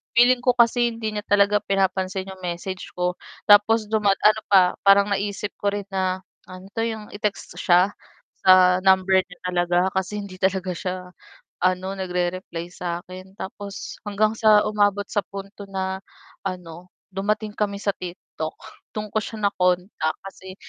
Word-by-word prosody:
feeling 245 Hz, +1 st, +6 dB
ko 250 Hz, 0 st, +2 dB
kasi 240 Hz, 0 st, +4 dB
hindi 220 Hz, -1 st, -3 dB
niya 210 Hz, -1 st, -5 dB
talaga 205 Hz, 0 st, +4 dB
pinapansin 190 Hz, -1 st, -1 dB
'yong 190 Hz, -, -11 dB
message 180 Hz, +1 st, -5 dB
ko. 180 Hz, 0 st, -1 dB, 0.2 s
Tapos 210 Hz, +1 st, +5 dB
duma 210 Hz, -3 st, +3 dB
ano 215 Hz, +2 st, +3 dB
pa, 195 Hz, -2 st, +7 dB, 0.3 s
parang 200 Hz, +1 st, +6 dB
naisip 200 Hz, +1 st, -2 dB
ko 205 Hz, -, -2 dB
rin 205 Hz, -, -3 dB
na 190 Hz, -1 st, -1 dB, 0.2 s
ano 185 Hz, +1 st, -11 dB
'to, 225 Hz, -, -5 dB
'yong 220 Hz, -2 st, -4 dB
i-text 205 Hz, 0 st, -4 dB
siya, 180 Hz, +2 st, +4 dB, 0.5 s
sa 185 Hz, -1 st, +6 dB
number 190 Hz, 0 st, +4 dB
niya 185 Hz, -, -6 dB
talaga, 180 Hz, 0 st, +1 dB
kasi 190 Hz, +2 st, -2 dB
hindi 185 Hz, -2 st, -10 dB
talaga 190 Hz, -1 st, 0 dB
siya 180 Hz, +2 st, -3 dB, 0.7 s
ano, 185 Hz, +1 st, 0 dB
nagre-reply 180 Hz, -2 st, -3 dB
sa 175 Hz, -1 st, -4 dB
'kin, 185 Hz, +1 st, -11 dB
tapos 200 Hz, 0 st, -7 dB
hanggang 215 Hz, +1 st, +1 dB
sa 215 Hz, -1 st, +6 dB
umabot 205 Hz, -1 st, +1 dB
sa 205 Hz, -, -1 dB
punto 200 Hz, +1 st, -9 dB
na 190 Hz, 0 st, -2 dB, 0.5 s
ano, 180 Hz, -1 st, -6 dB, 0.2 s
dumating 210 Hz, +2 st, -2 dB
kami 200 Hz, -1 st, -1 dB
sa 200 Hz, -1 st, 0 dB
TikTok, 175 Hz, -3 st, -7 dB, 0.4 s
dun 215 Hz, 0 st, -4 dB
ko 215 Hz, -, 0 dB
siya 220 Hz, +2 st, -7 dB
na-contact 180 Hz, -3 st, 0 dB
kasi 190 Hz, -1 st, -10 dB
195 Hz, 155 wpm, -23 LUFS, 185-205 Hz, 0.7 s, pa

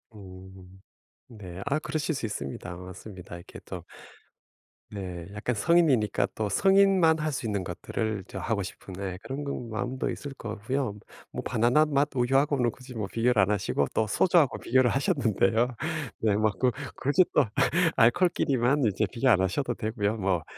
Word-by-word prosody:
음. 95 Hz, -1 st, -13 dB, 0.5 s
네. 95 Hz, -5 st, -9 dB
아 145 Hz, +2 st, +1 dB
그러실 155 Hz, +1 st, -2 dB
수 125 Hz, -, -3 dB
있습니다. 90 Hz, -2 st, -5 dB
맞습니다. 90 Hz, 0 st, -10 dB
이렇게 85 Hz, -, -11 dB
또 -, -, -7 dB, 1.1 s
네 90 Hz, -4 st, -6 dB
약간 110 Hz, +3 st, -2 dB
성인이니까 140 Hz, -6 st, +3 dB
또 105 Hz, -2 st, -1 dB
성인만 195 Hz, -, +4 dB
할 155 Hz, 0 st, -1 dB
수 130 Hz, -, -4 dB
있는 100 Hz, -3 st, -1 dB
것들을 105 Hz, +3 st, -3 dB
저 95 Hz, -, -7 dB
하고 105 Hz, +1 st, -1 dB
싶은 95 Hz, 0 st, -8 dB
네 95 Hz, -1 st, -5 dB
그런 140 Hz, +2 st, -5 dB
건 125 Hz, -4 st, -4 dB
마음도 125 Hz, +4 st, -2 dB
있을 140 Hz, -2 st, -6 dB
것 115 Hz, -5 st, -8 dB
같고요. 115 Hz, -1 st, -2 dB, 0.3 s
뭐 -, -, -4 dB
바나나맛 140 Hz, +5 st, +3 dB
우유하고는 130 Hz, 0 st, +2 dB
굳이 130 Hz, 0 st, -12 dB
뭐 105 Hz, -4 st, -3 dB
비교를 115 Hz, -1 st, +2 dB
안 95 Hz, +2 st, +2 dB
하시고 90 Hz, -8 st, 0 dB
또 110 Hz, -, +2 dB
소주하고 165 Hz, -, +3 dB
비교를 130 Hz, -1 st, +3 dB
하셨는데요. 120 Hz, -, +1 dB, 0.4 s
네 105 Hz, -2 st, +2 dB
막 110 Hz, -1 st, 0 dB
굳 125 Hz, -3 st, +2 dB, 0.2 s
굳이 145 Hz, +7 st, +3 dB
또 -, -, +4 dB, 0.5 s
알코올끼리만 135 Hz, 0 st, +3 dB
이제 105 Hz, +2 st, +1 dB
비교 130 Hz, +2 st, +1 dB
안 100 Hz, -6 st, +5 dB
하셔도 120 Hz, +7 st, -1 dB
되고요. 110 Hz, -1 st, -1 dB
뭐 95 Hz, -5 st, 0 dB
115 Hz, 330 characters per minute, -27 LUFS, 100-135 Hz, 1.1 s, 안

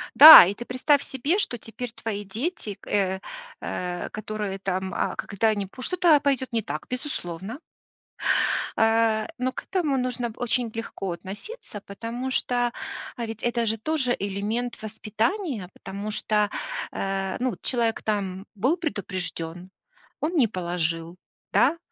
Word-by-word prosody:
Да, 310 Hz, -, +13 dB
и 195 Hz, -, -1 dB
ты 240 Hz, -, -6 dB
представь 275 Hz, +4 st, +2 dB
себе, 280 Hz, +8 st, 0 dB
что 250 Hz, -, -1 dB
теперь 225 Hz, +2 st, -7 dB
твои 210 Hz, -3 st, -4 dB
дети, 220 Hz, -, -4 dB
к -, -, -18 dB
э, 190 Hz, -2 st, +1 dB, 0.4 s
э, 180 Hz, -1 st, -4 dB
которые 210 Hz, -2 st, -4 dB
там, 190 Hz, -1 st, -2 dB
а, -, -, -1 dB
когда 220 Hz, +3 st, 0 dB
они 205 Hz, -2 st, 0 dB
пу 225 Hz, +7 st, -12 dB
что-то 345 Hz, -2 st, +4 dB
пойдет 260 Hz, -3 st, 0 dB
не 225 Hz, -, +2 dB
так, -, -, -5 dB
безусловно. 230 Hz, -, -4 dB, 1.2 s
Э, 225 Hz, -1 st, +3 dB
но 255 Hz, +1 st, 0 dB
к -, -, -7 dB
этому 315 Hz, -8 st, 0 dB
нужно 245 Hz, -2 st, -1 dB
очень 245 Hz, -1 st, +1 dB
легко 195 Hz, -4 st, -4 dB
относиться, 205 Hz, -, -8 dB
потому 235 Hz, +6 st, -5 dB
что, 245 Hz, -1 st, +1 dB, 0.5 s
ведь, 225 Hz, -2 st, -5 dB
это 240 Hz, -1 st, +1 dB
же 225 Hz, 0 st, 0 dB
тоже 260 Hz, 0 st, 0 dB
элемент 210 Hz, +4 st, -2 dB
воспитания, 220 Hz, -, -2 dB
потому 200 Hz, +2 st, -6 dB
что, 210 Hz, 0 st, +1 dB, 0.4 s
э, 195 Hz, -1 st, -2 dB
ну, 255 Hz, 0 st, 0 dB
человек, 235 Hz, -3 st, 0 dB
там, 195 Hz, -2 st, -2 dB
был 260 Hz, -, +2 dB
предупрежден, 185 Hz, -, -4 dB, 0.5 s
он 320 Hz, +4 st, -1 dB
не 255 Hz, -7 st, +5 dB
положил, 170 Hz, -3 st, -2 dB, 0.4 s
да, 245 Hz, -, +4 dB
225 Hz, 140 wpm, -25 LUFS, 195-255 Hz, 1.2 s, Да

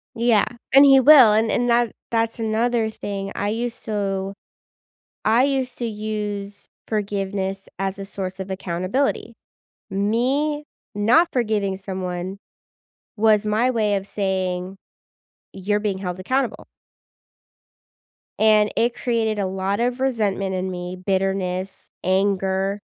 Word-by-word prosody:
Yeah, 230 Hz, -2 st, +3 dB, 0.3 s
and 275 Hz, +1 st, +9 dB
he 270 Hz, -1 st, +7 dB
will, 260 Hz, -6 st, +8 dB
and 220 Hz, +1 st, +2 dB
and 245 Hz, 0 st, +1 dB
that 235 Hz, -1 st, +3 dB, 0.2 s
that's 230 Hz, 0 st, 0 dB
another 225 Hz, +1 st, +1 dB
thing. 200 Hz, -2 st, -5 dB
I 205 Hz, -, -1 dB
used 240 Hz, +2 st, -3 dB
to 195 Hz, -2 st, -2 dB, 0.9 s
I 230 Hz, +4 st, +4 dB
used 265 Hz, -2 st, -1 dB
to 240 Hz, -, -2 dB
use 210 Hz, -2 st, -4 dB, 0.2 s
forgiveness 195 Hz, -2 st, -2 dB
as 195 Hz, 0 st, -2 dB
a 195 Hz, -, -5 dB
source 190 Hz, -1 st, -5 dB
of 190 Hz, 0 st, -5 dB
accountability. 190 Hz, +8 st, -2 dB, 0.6 s
Me 255 Hz, +10 st, 0 dB, 0.3 s
not 235 Hz, +12 st, +4 dB
forgiving 210 Hz, -5 st, 0 dB
someone 185 Hz, -1 st, -5 dB, 0.8 s
was 215 Hz, -1 st, +3 dB
my 225 Hz, +4 st, +2 dB
way 215 Hz, -4 st, +1 dB
of 195 Hz, -, -4 dB
saying, 190 Hz, -2 st, -2 dB, 0.8 s
"You're 205 Hz, +2 st, -1 dB
being 205 Hz, -3 st, -2 dB
held 180 Hz, -2 st, -4 dB
accountable." 260 Hz, +5 st, -1 dB, 1.7 s
And 215 Hz, -1 st, +4 dB
it 235 Hz, +1 st, +2 dB
created 225 Hz, -3 st, -1 dB
a 195 Hz, -, 0 dB
lot 195 Hz, +2 st, -2 dB
of 245 Hz, +1 st, 0 dB
resentment 210 Hz, -7 st, 0 dB
in 185 Hz, 0 st, -2 dB
me, 180 Hz, 0 st, -5 dB
bitterness, 190 Hz, 0 st, -2 dB
anger. 195 Hz, +1 st, 0 dB
205 Hz, 125 wpm, -22 LUFS, 190-230 Hz, 1.7 s, and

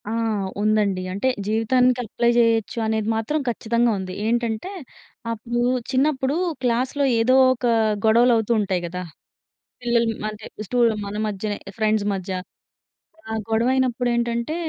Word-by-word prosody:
ఆ! -, -, -3 dB, 0.5 s
ఉందండి. 210 Hz, -3 st, +1 dB
అంటే, 200 Hz, +7 st, -1 dB, 0.2 s
జీవితానికి 250 Hz, +3 st, +2 dB
అప్లై 235 Hz, +2 st, 0 dB
జేయొచ్చు 230 Hz, -1 st, +2 dB
అనేది 220 Hz, -1 st, -1 dB
మాత్రం 225 Hz, +8 st, -1 dB
ఖచ్చితంగా 235 Hz, 0 st, +1 dB
ఉంది. 185 Hz, -1 st, -5 dB
ఏంటంటే 235 Hz, -, -1 dB, 0.6 s
అప్పుడు 235 Hz, +2 st, -3 dB, 0.3 s
చిన్నప్పుడు 270 Hz, 0 st, +1 dB, 0.3 s
క్లాస్‌లో 250 Hz, +4 st, 0 dB, 0.2 s
ఏదో 250 Hz, +3 st, +4 dB, 0.2 s
ఒక 250 Hz, 0 st, -5 dB, 0.4 s
గొడవలవుతూ 230 Hz, 0 st, +4 dB
ఉంటాయి 190 Hz, -3 st, 0 dB
గదా! 180 Hz, +2 st, -5 dB, 0.8 s
పిల్లలు 235 Hz, -1 st, +2 dB, 0.2 s
అంటే 215 Hz, 0 st, -10 dB, 0.2 s
స్టు 250 Hz, -, -2 dB, 0.3 s
మన 200 Hz, +1 st, -6 dB
మధ్యనే 205 Hz, 0 st, -3 dB, 0.2 s
ఫ్రెండ్స్ 215 Hz, -1 st, +1 dB
మధ్య. 190 Hz, -1 st, -5 dB, 1.0 s
ఆ -, -, -4 dB, 0.2 s
గొడవయినప్పుడేంటంటే, 235 Hz, +2 st, 0 dB
230 Hz, 115 wpm, -22 LUFS, 215-245 Hz, 1.0 s, ఏదో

